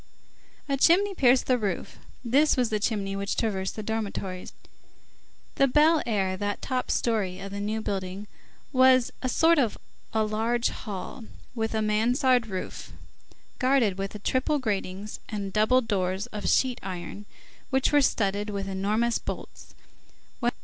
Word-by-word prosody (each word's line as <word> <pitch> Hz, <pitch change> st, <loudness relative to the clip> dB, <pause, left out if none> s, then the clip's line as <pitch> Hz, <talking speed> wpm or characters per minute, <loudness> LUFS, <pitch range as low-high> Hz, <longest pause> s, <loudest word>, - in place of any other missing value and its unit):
A 275 Hz, -1 st, 0 dB
chimney 380 Hz, +8 st, +4 dB
pierced 260 Hz, -7 st, +4 dB
the 255 Hz, -1 st, +2 dB
roof; 200 Hz, -5 st, -3 dB, 0.3 s
this 280 Hz, +5 st, +3 dB
was 245 Hz, -3 st, +1 dB
the 215 Hz, -, +1 dB
chimney 200 Hz, -2 st, -1 dB
which 200 Hz, +1 st, -2 dB
traversed 195 Hz, -4 st, -1 dB
the 215 Hz, -, -5 dB
dormitories. 200 Hz, -4 st, -4 dB, 1.1 s
The 275 Hz, -, +5 dB
Bel 305 Hz, +4 st, +4 dB
Air, 195 Hz, -4 st, 0 dB
that 205 Hz, +1 st, -2 dB
top 255 Hz, -1 st, -2 dB
story 205 Hz, -6 st, 0 dB
of 195 Hz, 0 st, -7 dB
the 200 Hz, -, -5 dB
New 215 Hz, +2 st, -2 dB
Building, 195 Hz, -1 st, -4 dB, 0.5 s
was 255 Hz, -1 st, +5 dB
a 255 Hz, -, -1 dB
sort 325 Hz, +4 st, +4 dB
of 235 Hz, -6 st, +1 dB, 0.3 s
large 220 Hz, +2 st, +1 dB
hall, 215 Hz, +4 st, -7 dB, 0.3 s
with 225 Hz, -2 st, -2 dB
a 220 Hz, -, +1 dB
Mansard 245 Hz, +3 st, +2 dB
roof, 190 Hz, -3 st, -6 dB, 0.7 s
guarded 255 Hz, -7 st, +2 dB
with 195 Hz, +1 st, -5 dB
triple 265 Hz, +4 st, +1 dB
gratings 205 Hz, -4 st, -3 dB
and 200 Hz, -3 st, -4 dB
double 215 Hz, +4 st, +4 dB
doors 195 Hz, -3 st, -1 dB
of 210 Hz, -, -2 dB
sheet 255 Hz, -2 st, +2 dB
iron, 185 Hz, +2 st, -7 dB, 0.4 s
which 265 Hz, 0 st, +2 dB
were 290 Hz, -1 st, +5 dB
studded 205 Hz, -4 st, 0 dB
with 200 Hz, -1 st, -3 dB
enormous 210 Hz, +5 st, 0 dB
bolts. -, -, -8 dB
220 Hz, 140 wpm, -27 LUFS, 200-255 Hz, 1.1 s, The